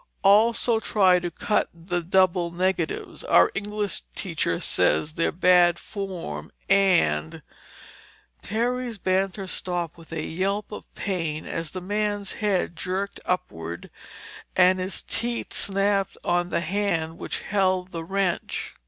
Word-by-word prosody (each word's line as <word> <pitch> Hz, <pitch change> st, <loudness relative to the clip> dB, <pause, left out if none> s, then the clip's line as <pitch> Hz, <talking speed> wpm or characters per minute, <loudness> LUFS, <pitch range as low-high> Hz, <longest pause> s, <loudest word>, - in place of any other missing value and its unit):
"Also 225 Hz, +3 st, +4 dB
try 190 Hz, -5 st, +4 dB
to 175 Hz, 0 st, -3 dB
cut 215 Hz, +5 st, 0 dB
the 175 Hz, +1 st, -3 dB
double 180 Hz, 0 st, +2 dB
negatives. 175 Hz, -1 st, -2 dB
Our 90 Hz, +1 st, +5 dB
English 205 Hz, -, -2 dB
teacher -, -, -1 dB
says 155 Hz, -, +1 dB
they're 165 Hz, -, +1 dB
bad 175 Hz, -1 st, +5 dB
form 175 Hz, -, -6 dB, 0.2 s
and—" 175 Hz, -, +2 dB, 1.0 s
Terry's 240 Hz, +2 st, -2 dB
banter 190 Hz, +1 st, 0 dB
stopped 175 Hz, -3 st, -3 dB
with 165 Hz, -, -15 dB
a 160 Hz, -1 st, -3 dB
yelp 195 Hz, +6 st, -2 dB
of 210 Hz, -, -9 dB
pain 165 Hz, -6 st, -2 dB
as 165 Hz, -1 st, -4 dB
the 185 Hz, +3 st, -6 dB
man's 205 Hz, +1 st, -1 dB
head 195 Hz, -5 st, 0 dB
jerked 185 Hz, +4 st, -3 dB
upward 85 Hz, -, -3 dB, 0.6 s
and 185 Hz, 0 st, +5 dB
his 185 Hz, +1 st, -2 dB
teeth 235 Hz, 0 st, -1 dB
snapped 195 Hz, 0 st, 0 dB
on 175 Hz, 0 st, +1 dB
the 170 Hz, -, 0 dB
hand 170 Hz, -3 st, -1 dB
which -, -, -4 dB
held 185 Hz, -2 st, 0 dB
the 165 Hz, -1 st, -5 dB
wrench. 190 Hz, 0 st, -2 dB
185 Hz, 125 wpm, -25 LUFS, 170-200 Hz, 1.0 s, Our